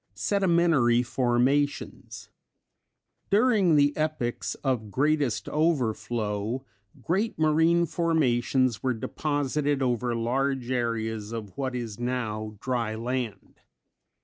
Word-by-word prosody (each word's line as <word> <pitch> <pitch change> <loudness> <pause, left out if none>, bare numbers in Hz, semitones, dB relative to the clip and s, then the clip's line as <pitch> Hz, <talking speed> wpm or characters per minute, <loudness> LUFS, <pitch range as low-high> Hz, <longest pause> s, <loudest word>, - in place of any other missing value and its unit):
Sedimentary 170 - +3
Formations. 130 +4 -1 1.0
During 205 -6 +4
the 145 0 +3
epochs 155 -6 -2
of 125 -6 -1
greatest 145 +1 0
overflow 120 -6 -1 0.4
great 200 +7 0
marine 160 +2 +3
formations 130 - +1
were 130 -2 0
deposited 145 +2 -1
over 120 -1 0
large 130 +2 -1
areas 110 -3 -2
of 110 -5 -6
what 130 -2 -3
is 115 -3 -5
now 110 -4 -3
dry 115 -3 -2
land. 115 -3 -4
130 Hz, 95 wpm, -27 LUFS, 115-150 Hz, 1.0 s, During